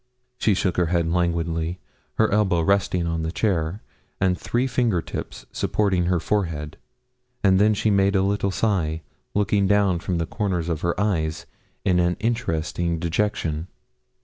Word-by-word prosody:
She 105 - +3
shook 90 -1 0
her 90 -2 +2
head 85 -1 +1
languidly, 85 0 0 0.4
her - - +2
elbow 100 -5 +2
resting 90 -1 +1
on 85 -1 -1
the 80 0 -2
chair, 90 -1 -1 0.4
and 95 -1 +2
three 120 +7 -1
finger 120 -7 +1
tips - - -6
supporting 95 -4 +1
her 90 0 +2
forehead, 80 -7 -2 0.7
and 95 -2 +5
then 105 +1 +4
she 105 +1 +1
made 100 0 +3
a 95 - +3
little 100 0 +1
sigh, 90 -6 0 0.3
looking 100 -1 +2
down 100 -3 +3
from 90 0 -2
the 85 - 0
corners 90 -3 -2
of 80 -3 -2
her 85 +2 -1
eyes, 80 -7 0 0.4
in 90 -3 +3
an 90 0 +1
interesting 85 -7 -1
dejection. 85 -2 -1
90 Hz, 155 wpm, -24 LUFS, 85-100 Hz, 0.7 s, and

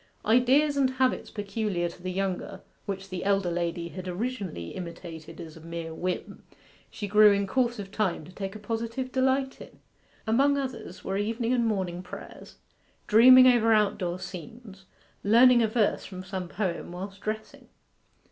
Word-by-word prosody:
Ideas 260 +6 +4
and 270 -2 +3
habits 260 0 0
peculiar 205 -4 -2
to 170 +1 -11
the 185 0 -4
younger, 190 0 -3 0.3
which 195 -1 -5
the 185 -2 -4
elder 195 -3 +1
lady 170 0 -2
had 185 +1 -8
originally 185 - -4
imitated 165 - -8
as 160 -2 -9
a 160 - -12
mere 165 0 -6
whim, 180 +2 -4 0.5
she 205 - -6
grew 210 +1 +7
in 200 0 +1
course 240 +3 0
of 195 -2 -7
time 190 -7 -1
to 180 - -13
take 195 +2 -6
a - - -7
positive 230 +4 -4
delight 265 +1 0
in. - - -12 0.5
Among 275 +6 +3
others 260 -9 -5
were 195 - -2
evening 230 +4 -1
and 235 -2 +2
morning 185 -5 -2
prayers, 180 - -11 0.5
dreaming 255 +4 +8
over 235 -3 +5
out 210 -1 +2
door 175 -2 -2
scenes, 190 - -10 0.4
learning 240 +4 +6
a 225 - +3
verse 220 -1 +1
from 185 -1 -8
some 185 -1 -5
poem 175 -2 -3
whilst 195 +2 -7
dressing. 215 0 -5
200 Hz, 165 wpm, -27 LUFS, 180-235 Hz, 0.5 s, dreaming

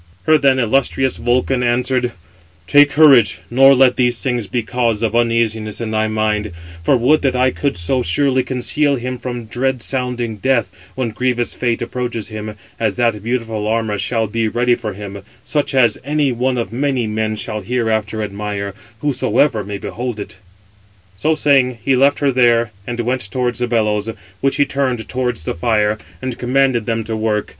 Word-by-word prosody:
Her 155 -1 +4
then 135 -2 +3
illustrious 130 +2 +1
Vulcan 125 +2 +1
answered: 125 +1 0 0.5
"Take 145 +8 +6
courage, 140 -8 +5
nor 135 +2 +6
let 130 -1 +4
these 125 -2 +2
things 120 -5 -2
be 120 +5 -2
cause 115 -1 -1
of 110 -1 0
uneasiness 115 -2 0
in 115 -2 -3
thy 110 0 +1
mind; 110 -2 -1 0.3
for 130 - +3
would 140 +6 +3
that 135 -2 +1
I 130 +1 +3
could 140 -4 -2
so 125 +10 0
surely 130 +7 +2
conceal 140 +3 0
him 125 0 -4
from 120 -2 -5
dread 125 +2 -1
sounding 125 -4 -1
death, 120 -2 +1 0.2
when 125 -3 -2
grievous 120 +1 -1
fate 120 -2 -1
approaches 120 -4 -4
him, 110 -1 -6 0.2
as 110 -4 0
that 115 -4 0
beautiful 115 -2 -2
armour 110 -2 -1
shall 110 +3 0
be 115 +1 -1
ready 120 +2 +1
for 110 -3 -3
him, 100 0 -8 0.2
such 145 -2 -1
as 120 -4 +3
any 145 -2 +1
one 125 +1 -1
of 115 -1 -3
many 130 -1 0
men 110 0 -2
shall 105 0 -4
hereafter 110 -1 -1
admire, 100 -1 -4 0.3
whosoever 130 -4 +1
may 100 +1 -5
behold 120 +2 -5
it." 100 - -8 0.8
So 155 +11 +1
saying, 135 -5 +2
he 135 - +3
left 140 +2 +3
her 140 -2 +1
there, 120 -3 +3 0.2
and 120 0 -4
went 120 -3 -2
towards 125 +3 -1
the 125 - 0
bellows, 105 -2 0 0.3
which 135 0 +1
he 145 0 +3
turned 130 -5 -2
towards 125 -9 -2
the - - -2
fire, 105 +3 +1 0.2
and 130 -2 -4
commanded 125 -2 +1
them 115 -1 -1
to 110 0 -4
work. 110 -1 -1
120 Hz, 175 wpm, -18 LUFS, 110-130 Hz, 0.8 s, Take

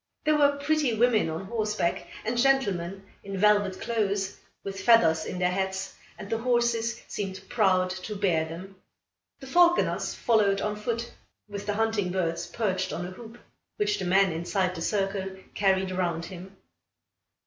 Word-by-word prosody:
There 305 0 +3
were 285 -1 +4
pretty 285 -3 +1
women 225 -5 +3
on 160 +4 -4
horseback, 210 -4 -1 0.2
and 230 +3 -1
gentlemen 200 -8 +1 0.2
in 195 -1 -5
velvet 205 -1 +3
clothes, 200 -4 -1 0.3
with 195 -1 -5
feathers 165 -8 +5
in - - -5
their 180 0 +1
hats, 190 0 -2 0.2
and 200 - -8
the 225 +2 -1
horses 235 -1 0
seemed 195 -2 -4
proud 185 -5 +2
to 185 +3 -6
bear 180 -6 +1
them. 185 +4 -9 0.6
The - - -8
falconers 350 +5 +3
followed 210 -4 +2
on 210 +1 -1
foot, 230 +2 -3 0.4
with 205 0 -7
the 205 - 0
hunting 220 -4 0
birds 170 -3 -1
perched 190 -4 -1
on 175 - -4
a 180 - -6
hoop, 225 +4 -11 0.4
which 420 0 0
the - - -3
man 190 +1 +4
inside 180 +3 -1
the 165 - -7
circle 195 0 -1 0.2
carried 190 -1 +2
round 170 -3 -1
him. 185 +2 -10
195 Hz, 160 wpm, -27 LUFS, 185-230 Hz, 0.6 s, feathers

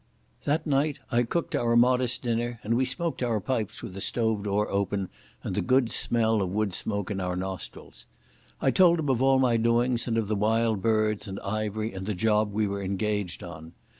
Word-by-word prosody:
That 150 +2 0
night 145 0 +1
I 120 0 +3
cooked 160 +8 -2
our 115 0 +1
modest 125 +1 +3
dinner, 120 0 -1
and 110 - 0
we 130 +2 +2
smoked 155 +5 -2
our 115 -3 +1
pipes 110 -1 -3
with 90 - -7
the 100 - -6
stove 110 -2 0
door 105 +1 +1
open 100 -1 -1 0.3
and - - -3
the - - 0
good 130 -2 +2
smell 110 -2 +2
of 95 - -1
woodsmoke 100 0 -1
in 95 -1 -2
our 90 -1 -2
nostrils. 90 -9 -6 0.5
I 135 - +2
told 175 0 +5
him 150 -3 -2
of 130 -2 +1
all 135 0 +4
my 125 -3 +3
doings 115 +1 +2
and 115 -1 0
of 110 -2 0
the 105 - 0
Wild 110 0 +1
Birds 110 -1 +1
and 95 0 -5
Ivery 110 +1 -3
and 95 0 -6
the 105 - -1
job 105 +2 +2
we 105 +1 0
were 100 0 -3
engaged 100 -1 -2
on. 80 -2 -10
110 Hz, 200 wpm, -27 LUFS, 100-120 Hz, 0.5 s, told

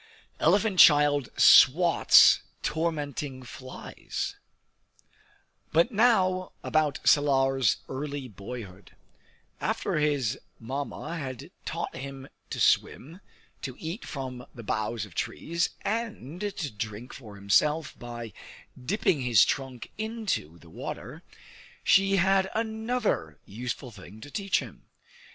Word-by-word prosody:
Elephant 195 +3 +2
Child 145 -4 +6
"Swats" 170 +6 +7 0.2
Tormenting 145 -4 -3
Flies 130 +1 -6 1.4
But 165 +10 +3
now 190 -5 +2
about 155 -3 +1
Salar's 135 -4 +3
early 140 0 -5
boyhood. 100 -2 -10 0.6
After - - -1
his 140 -5 0 0.2
Mamma 140 +7 -5
had 130 -4 -7
taught - - -4
him 135 0 -8 0.2
to - - -5
swim, 165 +8 +1 0.4
to 130 -3 -5
eat 170 +7 -6
from 130 -3 -6
the 115 - -9
boughs 110 +1 -2
of 100 - -16
trees, 170 - -2
and 205 - -4
to 195 -8 -3
drink 110 +3 -6
for 110 -6 -11
himself 150 +10 +1
by 120 -3 -7 0.5
dipping 165 - +1
his 120 -6 +5
trunk 130 -4 -4
into 220 - -3
the 85 -1 -17
water, - - -7 0.6
she 195 0 +4
had 190 +1 +3
another 220 - -1
useful 125 +4 -6
thing 100 0 -13
to 145 - -10
teach 200 -2 0
him. - - -12
140 Hz, 110 wpm, -27 LUFS, 120-180 Hz, 1.4 s, Swats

